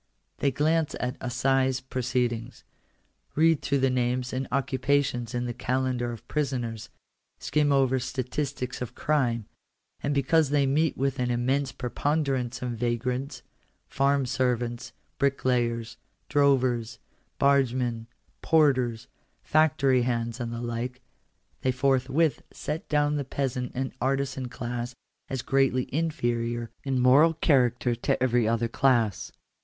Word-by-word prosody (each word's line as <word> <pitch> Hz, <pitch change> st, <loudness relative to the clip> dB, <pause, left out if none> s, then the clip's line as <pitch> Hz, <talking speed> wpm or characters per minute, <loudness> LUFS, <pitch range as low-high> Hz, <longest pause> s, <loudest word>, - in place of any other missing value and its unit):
They 140 Hz, -, +2 dB
glance 155 Hz, +3 st, +1 dB
at 125 Hz, +2 st, -2 dB
assize 130 Hz, +1 st, +1 dB
proceedings, 125 Hz, -3 st, -2 dB, 0.7 s
read 160 Hz, 0 st, +4 dB
through 140 Hz, -1 st, 0 dB
the 135 Hz, -1 st, +3 dB
names 125 Hz, 0 st, -1 dB
and 130 Hz, 0 st, -2 dB
occupations 130 Hz, -2 st, 0 dB
in 120 Hz, 0 st, -1 dB
the 120 Hz, -, -3 dB
calendar 125 Hz, -1 st, -1 dB
of 115 Hz, -, -10 dB
prisoners, 125 Hz, -7 st, -2 dB, 0.5 s
skim 150 Hz, -1 st, +1 dB
over 130 Hz, -1 st, +3 dB
statistics 130 Hz, +1 st, -3 dB
of 125 Hz, -, -5 dB
crime, 120 Hz, -7 st, 0 dB, 0.6 s
and 145 Hz, 0 st, -1 dB
because 145 Hz, +2 st, +3 dB
they 145 Hz, -1 st, +3 dB
meet 150 Hz, +3 st, +1 dB
with 135 Hz, 0 st, -1 dB
an 125 Hz, -1 st, 0 dB
immense 130 Hz, +3 st, 0 dB
preponderance 130 Hz, -2 st, -1 dB
of 125 Hz, -, -2 dB
vagrants, 125 Hz, +3 st, -2 dB, 0.4 s
farm 140 Hz, 0 st, +1 dB
servants, 125 Hz, -1 st, -1 dB, 0.3 s
bricklayers, 120 Hz, -4 st, 0 dB, 0.3 s
drovers, 130 Hz, -5 st, +2 dB, 0.4 s
bargemen, 125 Hz, -4 st, +1 dB, 0.3 s
porters, 130 Hz, -8 st, +2 dB, 0.4 s
factory 150 Hz, -4 st, +3 dB
hands, 120 Hz, -1 st, -1 dB
and 120 Hz, -1 st, -3 dB
the 115 Hz, 0 st, -5 dB
like, 120 Hz, +2 st, -4 dB, 0.6 s
they 130 Hz, -, +2 dB
forthwith 135 Hz, +4 st, +1 dB
set 155 Hz, +2 st, -5 dB
down 150 Hz, -1 st, +2 dB
the 145 Hz, -, -1 dB
peasant 130 Hz, -2 st, -3 dB
and 130 Hz, +1 st, -2 dB
artizan 135 Hz, -1 st, -1 dB
class 120 Hz, 0 st, -5 dB, 0.3 s
as 130 Hz, -2 st, -3 dB
greatly 135 Hz, -1 st, +2 dB
inferior 120 Hz, -7 st, -1 dB
in 135 Hz, -2 st, 0 dB
moral 140 Hz, +6 st, +5 dB
character 125 Hz, -6 st, +2 dB
to 120 Hz, +2 st, -1 dB
every 120 Hz, -3 st, +2 dB
other 115 Hz, +1 st, +1 dB
class. 115 Hz, -5 st, +1 dB
130 Hz, 125 wpm, -27 LUFS, 120-140 Hz, 0.7 s, moral